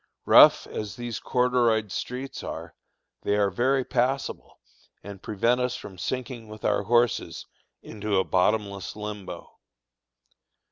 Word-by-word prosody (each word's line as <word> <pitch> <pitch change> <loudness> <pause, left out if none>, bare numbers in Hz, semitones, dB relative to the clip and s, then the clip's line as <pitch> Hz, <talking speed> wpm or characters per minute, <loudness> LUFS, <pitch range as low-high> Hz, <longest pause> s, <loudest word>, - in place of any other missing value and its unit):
Rough - - +7
as 105 -2 -6
these 120 -2 -5
corduroyed 120 -4 +1
streets 130 +6 -5
are, - - -7 0.5
they 100 - 0
are 100 -1 +2
very 130 +6 +1
passable, 130 +2 -2 0.4
and 100 -1 -9
prevent 115 +4 +1
us 125 0 -1
from 95 -7 -10
sinking 125 -1 -4
with 110 0 -10
our 105 -1 +2
horses 120 +1 +1 0.4
into 105 -2 -2
a 95 - +3
bottomless 100 +1 0
limbo. 105 -4 -8
110 Hz, 125 wpm, -26 LUFS, 100-125 Hz, 0.5 s, Rough